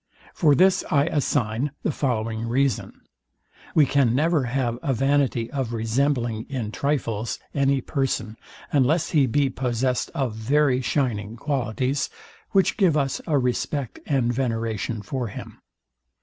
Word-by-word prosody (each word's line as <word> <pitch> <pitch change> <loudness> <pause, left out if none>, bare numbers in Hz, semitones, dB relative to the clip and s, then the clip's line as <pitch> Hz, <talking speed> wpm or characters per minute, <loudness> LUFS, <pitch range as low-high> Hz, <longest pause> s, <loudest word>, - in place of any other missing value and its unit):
For 150 -4 +4
this 185 +3 +4
I 140 -1 +3
assign 135 -3 0
the - - +1
following 115 -5 -2
reason. 135 +2 0 0.7
We 155 - +6
can 130 -4 +2
never 155 -1 +2
have 120 -1 -1
a 135 -5 0
vanity 135 -3 +1
of 130 -5 -2
resembling 115 0 0
in 120 -6 -3
trifles 115 -6 -1 0.2
any 140 -1 +2
person, 130 -5 -2 0.4
unless 150 +4 +2
he 145 -4 +4
be 140 +3 +2
possessed 125 0 -1
of 130 -5 -1
very 130 +4 +2
shining 115 -6 -1
qualities, 130 0 -1 0.4
which 195 -1 +2
give 180 -7 +3
us 135 -2 0
a 150 -3 +2
respect 125 0 -1
and 125 -4 +1
veneration 115 -3 -2
for 125 +3 -3
him. 100 - -9
130 Hz, 135 wpm, -24 LUFS, 115-140 Hz, 0.7 s, We